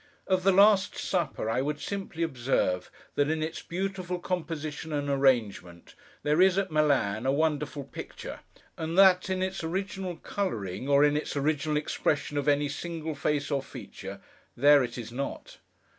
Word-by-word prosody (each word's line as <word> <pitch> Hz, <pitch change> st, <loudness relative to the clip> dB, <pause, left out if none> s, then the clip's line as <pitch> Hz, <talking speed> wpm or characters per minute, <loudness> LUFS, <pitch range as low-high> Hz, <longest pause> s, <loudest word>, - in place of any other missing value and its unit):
Of 185 Hz, -1 st, +2 dB
the 195 Hz, +2 st, +4 dB
Last 200 Hz, +1 st, +5 dB
Supper, 170 Hz, -, -1 dB
I 115 Hz, +3 st, +1 dB
would 145 Hz, +2 st, -2 dB
simply 190 Hz, -4 st, -4 dB
observe, 120 Hz, -, 0 dB, 0.2 s
that 145 Hz, 0 st, +1 dB
in 160 Hz, 0 st, 0 dB
its 160 Hz, +1 st, -4 dB
beautiful 185 Hz, 0 st, -3 dB
composition 160 Hz, -3 st, -4 dB
and 145 Hz, -1 st, -1 dB
arrangement, 120 Hz, -11 st, 0 dB, 0.3 s
there 150 Hz, +4 st, +3 dB
it 190 Hz, -, +8 dB
is, 190 Hz, 0 st, 0 dB
at 195 Hz, -3 st, 0 dB
Milan, 135 Hz, -7 st, +2 dB
a -, -, +4 dB
wonderful 150 Hz, -1 st, 0 dB
picture; 135 Hz, -, -8 dB, 0.4 s
and 165 Hz, +2 st, -3 dB
that, 190 Hz, -1 st, +6 dB
in 185 Hz, 0 st, 0 dB
its 190 Hz, -1 st, -3 dB
original 190 Hz, +1 st, -3 dB
colouring, 130 Hz, -, -3 dB
or 140 Hz, 0 st, +5 dB
in 145 Hz, 0 st, +2 dB
its 150 Hz, -1 st, -2 dB
original 150 Hz, +1 st, 0 dB
expression 150 Hz, 0 st, -1 dB
of 145 Hz, -, -4 dB
any 145 Hz, 0 st, +3 dB
single 160 Hz, +2 st, -4 dB
face 145 Hz, 0 st, -1 dB
or 140 Hz, -1 st, +1 dB
feature, -, -, -9 dB, 0.4 s
there 145 Hz, +2 st, +6 dB
it 125 Hz, -, -5 dB
is 115 Hz, -2 st, -6 dB
not. 135 Hz, +3 st, -5 dB
150 Hz, 165 wpm, -28 LUFS, 140-180 Hz, 0.4 s, it